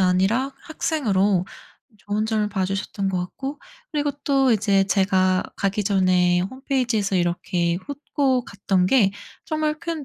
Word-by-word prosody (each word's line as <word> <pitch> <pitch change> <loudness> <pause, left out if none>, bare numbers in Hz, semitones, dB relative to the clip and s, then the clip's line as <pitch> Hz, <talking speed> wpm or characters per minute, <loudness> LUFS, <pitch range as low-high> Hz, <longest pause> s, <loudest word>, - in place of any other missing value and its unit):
아니라 195 +9 +2
학생으로 210 - 0 0.5
좋은 205 +2 -2
점을 215 -1 0
봐 195 -3 -1
주셨던 195 +1 -2
것 185 - -1
같고 270 +11 -5 0.3
그리고 290 -1 0
또 270 -2 +3
이제 200 -3 +3
제가 190 -2 +2
가기 200 +1 -1
전에 185 -3 +3
홈페이지에서 230 -2 -1
이렇게 175 -1 0
훑고 280 -3 -1
갔던 195 -2 0
게 210 -4 +4 0.3
정말 310 -1 -1
큰 325 -3 -4
205 Hz, 280 characters per minute, -23 LUFS, 185-270 Hz, 0.5 s, 게